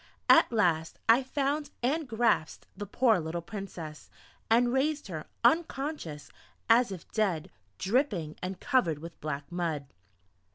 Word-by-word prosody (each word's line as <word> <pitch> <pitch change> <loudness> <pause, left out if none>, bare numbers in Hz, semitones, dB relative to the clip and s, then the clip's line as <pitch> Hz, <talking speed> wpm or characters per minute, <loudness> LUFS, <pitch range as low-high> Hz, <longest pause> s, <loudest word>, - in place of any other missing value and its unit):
At - - +7
last 170 -8 +1
I 230 +3 +6
found 280 +3 -1
and 295 +4 0
grasped 225 -8 +1
the 205 - -6
poor 225 -1 +3
little 165 +1 -4
Princess, 170 -6 -8 0.4
and 240 +2 +4
raised 295 +3 +1
her, 155 -4 -6 0.2
unconscious, 270 - 0 0.4
and 230 +1 +7
as 245 -5 -1
if 185 -3 -9
dead 190 -8 0 0.3
dripping, 195 - 0
and 185 +1 -4
covered 180 - +2
with 165 +2 -10
black 145 -1 -4
mud. 165 -5 -2
205 Hz, 135 wpm, -29 LUFS, 160-255 Hz, 0.4 s, At